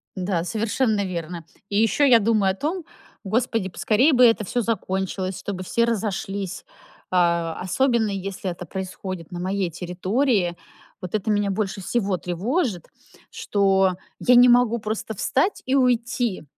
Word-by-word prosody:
Да, 185 -3 -1
совершенно 220 +1 0
верно. 170 -2 -5 0.2
И 200 - -1
ещё 225 +6 +2
я 245 -4 +7
думаю 210 -3 +2
о - - -5
том: 330 - -3 0.4
господи, 220 -1 0
поскорее 230 - +2
бы 250 -1 +6
это 225 -2 +4
всё 245 +6 -1
закончилось, 190 -3 -2
чтобы 190 -2 -5
все 235 +5 +1
разошлись, 200 -4 -3 0.5
э, - - -1
особенно 180 +7 +1
если 195 -1 -4
это 175 +1 -8
происходит 185 -1 -6
на 175 - -5
моей 190 0 -1
территории. 180 - 0 0.5
Вот 180 +2 -4
это 215 +1 -1
меня 205 -1 +1
больше 195 0 -2
всего 195 -1 -1
тревожит, 190 - -2 0.4
что 195 -2 +2 0.3
я 250 - +4
не 245 +1 +8
могу 240 -1 +4
просто 220 +1 -4
встать 275 - 0
и 260 - +1
уйти. 245 -5 +1
200 Hz, 145 wpm, -23 LUFS, 185-235 Hz, 0.5 s, не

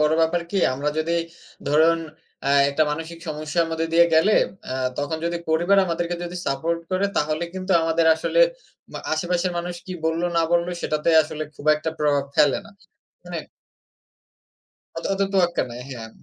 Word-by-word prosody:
বড় 150 +1 +3
ব্যাপার 165 +2 +2
কি? 200 - -2 0.2
আমরা 140 +3 -2
যদি 165 +2 0 0.6
ধরুন, 160 +3 +4 0.4
অ্যাঁ 140 0 +4
একটা 155 +3 +2
মানসিক 165 +2 -5
সমস্যার 155 +2 -1
মধ্যে 165 0 -1
দিয়ে 170 +1 +6
গেলে, 160 +7 +4 0.3
অ্যাঁ 130 0 -1
তখন 145 +3 -1
যদি 170 0 -1
পরিবার 175 +5 +3
আমাদেরকে 170 +1 -2
যদি 175 +1 -6
সাপোর্ট 165 +5 -1
করে, 185 +2 +1
তাহলে 155 +3 0
কিন্তু 185 0 -2
আমাদের 165 0 +2
আসলে 160 - 0 0.5
মা - - -5
আশেপাশের 175 +3 0
মানুষ 175 +1 -4
কী 185 - -5
বলল 160 +1 0
না 165 - +4
বলল, 170 0 +3 0.2
সেটাতে 155 +2 -1
আসলে 155 0 -6
খুব 145 - -11
একটা 160 +1 -3
প্রভাব 145 -2 +2
ফেলে - - +4
না। - - -15 0.5
মানে - - -5 1.6
অত - - -8
অত 195 - -2
তোয়াক্কা 175 -3 +2
নাই, 120 +1 -7
হ্যাঁ। 115 -3 -7
165 Hz, 165 wpm, -23 LUFS, 150-175 Hz, 1.6 s, দিয়ে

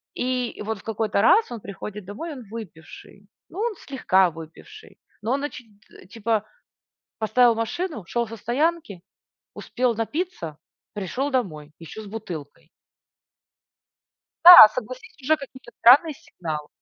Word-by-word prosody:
и 250 -3 -3
вот 220 -1 -4
в - - -17
какой-то 215 -2 -1
раз 410 - +4
он 230 -3 -7
приходит 200 0 -8
домой, 230 - -7
и - - -6
он 255 - -10
выпивший. 200 -1 -12 0.2
Ну, 370 - -9
он 460 -1 -1
слегка 190 -9 +1
выпивший. 165 - -13 0.2
Но 220 - -3
он 280 - -2
оч 290 -3 -6 0.3
т - - -17
типа, 220 +1 -2 0.7
поставил 230 +2 +3
машину, 230 - -4
шел 235 +6 -2
со 225 +1 -9
стоянки, 255 - -2 0.5
успел 250 -1 -2
напиться, 225 - -4 0.4
пришел 220 +8 -3
домой, 155 - -3
и 165 - -12
еще 220 - -9
с - - -12
бутылкой. 165 -7 -9 1.8
Да, 350 -10 +12
согласись, 255 +1 -8
уже 310 +4 +2
какие-то 260 -3 -12
странные 290 +7 +6
сигналы. 170 - -7
225 Hz, 140 wpm, -23 LUFS, 200-270 Hz, 1.8 s, Да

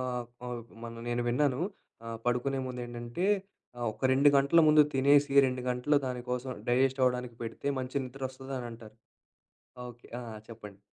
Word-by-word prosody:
ఆహ్, 125 -1 -2 0.2
ప - - -17 0.4
మొన్న 115 0 -7
నేను 120 0 0
విన్నాను 135 +2 +1 0.5
ఆహ్, 115 -1 -5
పడుకునే 125 +3 +1
ముండేంటంటే, 120 +5 -4 0.5
ఆహ్, 120 - -2
ఒక - - -21
2 140 +2 +6
గంటల 140 +5 +5
ముందు 150 0 +8
తినేసి 140 +1 +4
2 125 -1 -2
గంటలు 125 +4 +2
దానికోసం 125 +1 -3 0.2
డైజెస్ట్ 130 +2 +2
అవ్వడానికి 125 -1 0
పెడితే 115 +4 -6
మంచి 130 +2 -4
నిద్రొస్తదనంటారు. 130 -4 -7 0.9
ఓకె. 120 0 -13
ఆ! - - -7 0.3
చెప్పండి. 105 -3 -11
125 Hz, 135 wpm, -30 LUFS, 120-135 Hz, 0.9 s, ముందు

